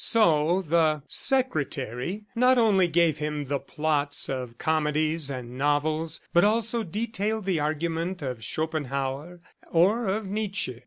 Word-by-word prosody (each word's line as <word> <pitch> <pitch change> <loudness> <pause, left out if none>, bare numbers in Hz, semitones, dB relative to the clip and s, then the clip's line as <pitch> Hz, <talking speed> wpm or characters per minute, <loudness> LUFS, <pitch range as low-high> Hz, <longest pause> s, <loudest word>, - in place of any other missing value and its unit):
So 175 -4 +3
the 155 -2 +2
"secretary," 155 - 0
not 250 +2 +4
only 205 -6 +4
gave 170 -2 +2
him 150 -1 -3
the 140 +1 -1
plots 145 0 -1
of 125 -3 -4
comedies 155 -1 0
and 125 -1 -6
novels, 155 +3 0
but 175 - +5
also 230 +2 +1
detailed 215 +1 -2
the 185 -4 +1
argument 165 +3 -2
of 125 -4 -4
Schopenhauer 145 +3 -3 0.3
or 200 +7 +3
of 205 +3 -1
Nietzsche 195 - -3
160 Hz, 125 wpm, -26 LUFS, 145-195 Hz, 0.3 s, but